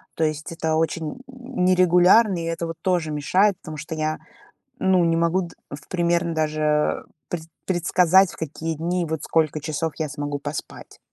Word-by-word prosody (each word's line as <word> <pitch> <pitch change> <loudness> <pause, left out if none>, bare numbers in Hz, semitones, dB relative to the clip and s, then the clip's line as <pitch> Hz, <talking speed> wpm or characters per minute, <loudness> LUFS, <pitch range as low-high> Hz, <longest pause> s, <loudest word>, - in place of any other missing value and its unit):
то 165 - 0
есть 155 0 -2
это 160 -1 -1
очень 160 +5 -2
нерегулярно, 185 -5 +3
и 165 - -4
это 165 0 -3
вот 165 -1 -6
тоже 175 -5 0
мешает, 185 +7 +2
потому 155 0 -8
что 155 +2 -6
я, 155 0 -1 0.6
ну, 185 -2 +3
не 165 0 +2
могу 170 +3 +2
д 170 -2 -9 0.2
в 140 0 -9
примерно 170 -1 0
даже 155 -1 0 0.2
пред 175 -2 -4 0.2
предсказать, 180 +1 +4
в - - -12
какие 160 +1 -4
дни, 170 +2 -1
вот 160 -1 -3
сколько 155 -2 +1
часов 155 +1 -2
я 155 -2 -1
смогу 145 0 -4
поспать. 145 +1 -7
165 Hz, 165 wpm, -23 LUFS, 155-180 Hz, 0.6 s, предсказать